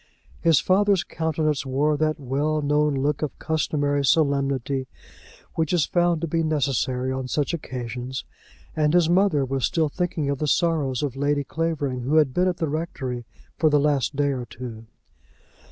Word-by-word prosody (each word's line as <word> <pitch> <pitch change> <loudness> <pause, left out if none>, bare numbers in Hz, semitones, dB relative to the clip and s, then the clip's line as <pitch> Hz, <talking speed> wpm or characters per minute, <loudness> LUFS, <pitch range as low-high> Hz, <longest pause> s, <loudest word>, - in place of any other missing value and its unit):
His 165 -3 +5
father's 195 0 +3
countenance 155 -2 -1
wore 140 +3 +1
that 155 +1 0
well 145 +3 -1
known 150 0 +2
look 140 +2 0
of 150 - -3
customary 145 -2 0
solemnity 140 -2 +1 0.7
which 160 +1 -1
is 165 -5 +3
found 175 -2 +1
to 170 - -1
be 165 +1 0
necessary 130 -4 0
on 130 -1 -3
such 145 +5 -1
occasions, 125 -3 -5 0.5
and 155 +1 +2
his 175 -2 +5
mother 180 -7 +3
was 135 0 -2
still 160 -3 +1
thinking 170 -3 -2
of 140 - -3
the 150 - -1
sorrows 150 -4 +1
of 135 -3 -2
Lady 145 +1 0
Clavering, 145 -5 -2
who 135 +6 0
had 150 -5 +4
been 180 +5 +2
at 180 -1 0
the 160 - -1
rectory 135 -6 -4 0.3
for 155 - +4
the 145 -1 +4
last 145 -1 +1
day 145 0 +1
or 125 -3 -3
two. 115 -1 -9
145 Hz, 170 wpm, -24 LUFS, 135-160 Hz, 0.7 s, His